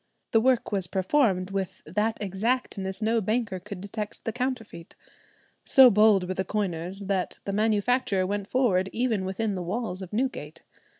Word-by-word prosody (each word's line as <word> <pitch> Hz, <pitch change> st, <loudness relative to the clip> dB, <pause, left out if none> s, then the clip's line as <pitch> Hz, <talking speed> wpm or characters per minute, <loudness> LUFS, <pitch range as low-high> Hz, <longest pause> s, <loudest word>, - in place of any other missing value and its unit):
The 225 Hz, -, +4 dB
work 255 Hz, -1 st, +2 dB
was 195 Hz, -3 st, 0 dB
performed 190 Hz, -1 st, +1 dB
"with 195 Hz, -2 st, -4 dB
that 210 Hz, +7 st, -1 dB
exactness 200 Hz, -1 st, -2 dB
no 225 Hz, +1 st, +2 dB
banker 215 Hz, -2 st, -1 dB
could 200 Hz, +1 st, -8 dB
detect 205 Hz, +1 st, -6 dB
the 225 Hz, -, -2 dB
counterfeit." 245 Hz, -9 st, -4 dB, 0.7 s
So 260 Hz, -2 st, +7 dB
bold 210 Hz, -3 st, +4 dB
were 185 Hz, -, -2 dB
the 190 Hz, -, -1 dB
coiners, 190 Hz, -2 st, -3 dB
that 190 Hz, -2 st, -1 dB
the 200 Hz, -, -3 dB
manufacture 215 Hz, -1 st, +1 dB
went 200 Hz, +1 st, -3 dB
forward 195 Hz, -8 st, +2 dB
even 225 Hz, -5 st, 0 dB
within 200 Hz, +3 st, -2 dB
the 185 Hz, -, -3 dB
walls 190 Hz, +1 st, -3 dB
of 185 Hz, -, -8 dB
Newgate. 210 Hz, -, -3 dB
205 Hz, 160 wpm, -26 LUFS, 190-225 Hz, 0.7 s, So